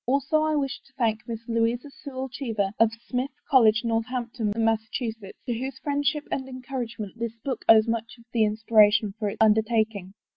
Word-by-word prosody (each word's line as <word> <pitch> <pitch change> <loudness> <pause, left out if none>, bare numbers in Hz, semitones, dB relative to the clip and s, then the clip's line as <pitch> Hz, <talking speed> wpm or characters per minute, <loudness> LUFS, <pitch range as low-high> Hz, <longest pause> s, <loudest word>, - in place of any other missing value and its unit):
Also 280 +4 +2
I 310 0 +1
wish 275 -2 -1
to 270 - -26
thank 225 -3 0
Miss 230 -1 -6
Louisa 235 +4 0
Sewall 265 -2 -6
Cheever, 225 -6 -2
of 225 -1 +5 0.2
Smith 255 +1 -1 0.2
College, 225 -6 +5
Northampton, 230 -1 -2
Mass., 225 -1 +2
to 235 -4 -2 0.3
whose 260 +2 -3
friend 285 +1 -2
ship 295 +1 0
and 265 -1 -3
encouragement 240 -5 -6
this 230 -1 -3
book 260 -4 -3
owes 220 0 +7
much 230 +1 -3
of 235 - -18
the 225 -2 +3
in 210 0 0
spiration 215 -2 +4
for 210 -2 0
its - - -7
tmdertaking. 220 -3 +2
230 Hz, 180 wpm, -26 LUFS, 220-260 Hz, 0.3 s, owes